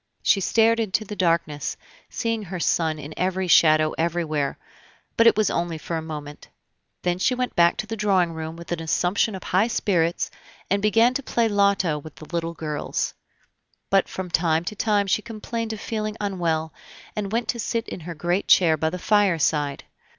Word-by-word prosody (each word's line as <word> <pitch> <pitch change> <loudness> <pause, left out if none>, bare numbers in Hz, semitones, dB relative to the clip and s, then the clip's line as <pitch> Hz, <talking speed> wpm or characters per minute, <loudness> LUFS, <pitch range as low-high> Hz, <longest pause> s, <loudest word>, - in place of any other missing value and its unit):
She 195 - +3
stared 230 +4 +3
into 215 -1 0
the 210 - -6
darkness, 165 -5 0 0.3
seeing 230 -2 -2
her 185 -2 -6
son 160 -2 +1
in 150 +1 -8
every 185 +1 0
shadow 155 -2 +5
everywhere; 160 -4 -1 0.6
but 230 - +5
it 230 - +5
was 215 -2 +2
only 170 -1 -1
for 165 +2 -5
a 160 - -2
moment. 150 -2 -8 0.6
Then 180 0 0
she 250 +7 +2
went 250 0 -2
back 170 0 +4
to - - -3
the 225 - -4
drawing 190 -5 +2
room 160 0 -6
with 170 +1 -11
an 170 -1 -2
assumption 180 +6 +1
of 185 - -8
high 190 +5 +2
spirits, 175 -7 0 0.4
and 200 0 +2
began 225 +4 +4
to 280 - -2
play 235 -3 0
at 225 - 0
loto 200 -6 +2
with 155 +1 -12
the 155 - -11
little 170 0 -2
girls. 150 -2 -3 0.8
But 195 -1 +3
from 185 -2 -6
time 165 -1 +1
to 210 - -4
time 205 -1 +1
she 195 +2 +1
complained 230 0 -5
of 220 - -5
feeling 215 -1 -3
unwell, 170 -6 -1 0.4
and 200 -2 -3
went 230 0 -1
to 235 - -1
sit 230 +1 -2
in - - -6
her 170 +1 -7
great 175 +5 -1
chair 165 -4 +5
by 160 +1 0
the 180 - -5
fireside. 165 -8 +1
180 Hz, 190 wpm, -24 LUFS, 160-210 Hz, 0.8 s, shadow